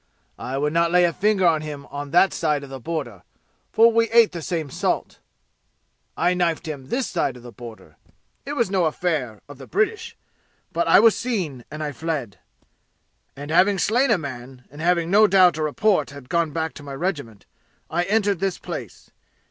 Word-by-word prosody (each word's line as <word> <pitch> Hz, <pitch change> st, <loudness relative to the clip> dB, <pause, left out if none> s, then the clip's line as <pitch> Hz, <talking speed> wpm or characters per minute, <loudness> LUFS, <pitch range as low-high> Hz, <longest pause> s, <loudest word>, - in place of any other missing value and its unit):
I 130 Hz, +2 st, -4 dB
would 150 Hz, +2 st, -1 dB
not 170 Hz, 0 st, +2 dB
lay 175 Hz, 0 st, +4 dB
finger 195 Hz, +2 st, +1 dB
on 160 Hz, -3 st, +3 dB
him 145 Hz, -2 st, -7 dB, 0.2 s
that 175 Hz, +6 st, +3 dB
side 150 Hz, -3 st, -1 dB
of 135 Hz, -, -11 dB
the 135 Hz, -, -7 dB
border, 125 Hz, -, -5 dB, 0.5 s
for 230 Hz, +1 st, +5 dB
we 230 Hz, 0 st, +2 dB
ate 230 Hz, -1 st, +5 dB
the 170 Hz, -, -6 dB
same 160 Hz, -4 st, -3 dB
salt. -, -, -2 dB, 1.0 s
I 175 Hz, +1 st, +2 dB
knifed 175 Hz, -2 st, -1 dB
him 140 Hz, -4 st, -6 dB
this 250 Hz, -, -1 dB
side 140 Hz, -7 st, -1 dB
the 120 Hz, -1 st, -11 dB
border. 115 Hz, -2 st, -12 dB, 0.5 s
It 285 Hz, -, -5 dB
was 235 Hz, -9 st, 0 dB
no 185 Hz, -3 st, +2 dB
affair 150 Hz, -, -2 dB
of 145 Hz, -2 st, -12 dB
the 135 Hz, -, -11 dB
British. 420 Hz, +2 st, -1 dB, 0.6 s
But 170 Hz, 0 st, 0 dB
I -, -, +7 dB
was 225 Hz, 0 st, +5 dB
seen, 175 Hz, -, -3 dB
and 155 Hz, 0 st, -6 dB
I 150 Hz, -, -3 dB
fled. 145 Hz, -8 st, -4 dB, 1.0 s
And 145 Hz, +2 st, -7 dB
having 190 Hz, +4 st, +4 dB
slain 245 Hz, +8 st, +2 dB
a 230 Hz, -, +4 dB
man, 130 Hz, -4 st, -8 dB
and 145 Hz, +2 st, -10 dB
having 170 Hz, 0 st, +1 dB
no 215 Hz, +2 st, +6 dB
doubt 185 Hz, -4 st, +5 dB
a -, -, -3 dB
report 155 Hz, +2 st, +1 dB
had 140 Hz, -3 st, -12 dB
gone 170 Hz, -2 st, +1 dB
back 160 Hz, +1 st, -3 dB
to 150 Hz, -, -11 dB
the 140 Hz, -1 st, -7 dB
regiment, 140 Hz, -, -4 dB, 0.4 s
I 175 Hz, -, -1 dB
entered 205 Hz, -2 st, +1 dB
this 195 Hz, -1 st, -1 dB
place. -, -, -8 dB
165 Hz, 185 wpm, -23 LUFS, 140-195 Hz, 1.0 s, I